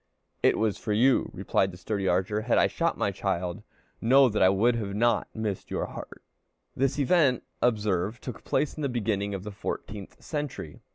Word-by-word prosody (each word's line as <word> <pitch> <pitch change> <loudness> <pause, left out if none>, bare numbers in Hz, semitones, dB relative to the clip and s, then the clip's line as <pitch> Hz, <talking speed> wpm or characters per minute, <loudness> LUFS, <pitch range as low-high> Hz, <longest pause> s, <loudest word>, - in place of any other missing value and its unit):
"It - - +4
was 110 -2 0
for 105 - -2
you," 125 +5 +3
replied 95 0 0
the 90 - -10
sturdy 95 +1 -2
archer. 95 +4 +1
"Had 115 +2 +1
I - - +5
shot - - 0
my - - 0
child, 85 0 -2 0.4
know 130 +3 +6
that 105 - -1
it 95 +1 +5
would 110 -1 +1
not 115 +1 +2
have - - -41
missed 105 -4 -3
your - - -2
heart." - - -9 0.5
This 135 +2 +1
event, 140 -3 +3 0.2
observe, 105 -2 +1
took 125 -5 -8
place 150 - 0
in 155 - -6
the 140 - 0
beginning 100 -4 -1
of 95 - -6
the 105 - -6
fourteenth 100 0 -6
century. 140 - -5
105 Hz, 185 wpm, -27 LUFS, 100-125 Hz, 0.5 s, know